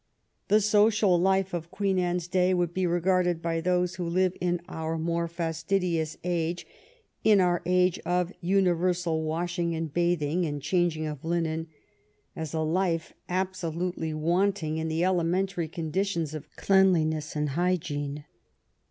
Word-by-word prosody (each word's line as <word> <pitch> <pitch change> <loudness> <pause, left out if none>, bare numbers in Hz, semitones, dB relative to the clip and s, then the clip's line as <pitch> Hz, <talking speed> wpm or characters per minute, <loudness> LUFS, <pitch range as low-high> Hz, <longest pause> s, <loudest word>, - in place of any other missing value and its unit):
The 215 +1 +4
social 210 -3 +4
life 190 0 +2
of 170 -1 -4
Queen 195 0 0
Anne's 175 -1 -1
day 185 0 +2
would 175 -1 0
be 185 0 0
regarded 175 0 +1
by 165 0 -1
those 180 +1 0
who 180 - -3
live 185 +1 +1
in 175 -1 +1
our 160 -2 -3
more 170 +1 -1
fastidious 165 0 -1
age, 175 -1 -1 0.6
in 210 -2 +5
our 175 -2 +2
age 180 0 +3
of 180 +1 -1
universal 180 -2 +1
washing 170 +2 -1
and 160 -2 -4
bathing 175 -1 +1
and 145 -3 -2
changing 170 0 0
of 150 -3 -5
linen, 165 -1 -1 0.7
as 160 -3 -5
a 160 - -1
life 165 +1 0 0.2
absolutely 180 -2 -2
wanting 165 +1 0
in 160 - -2
the 160 +2 0
elementary 180 0 0
conditions 170 0 -2
of 155 - -7
cleanliness 160 -6 +2
and 150 0 0
hygiene. 145 -3 -2
175 Hz, 140 wpm, -27 LUFS, 160-185 Hz, 0.7 s, in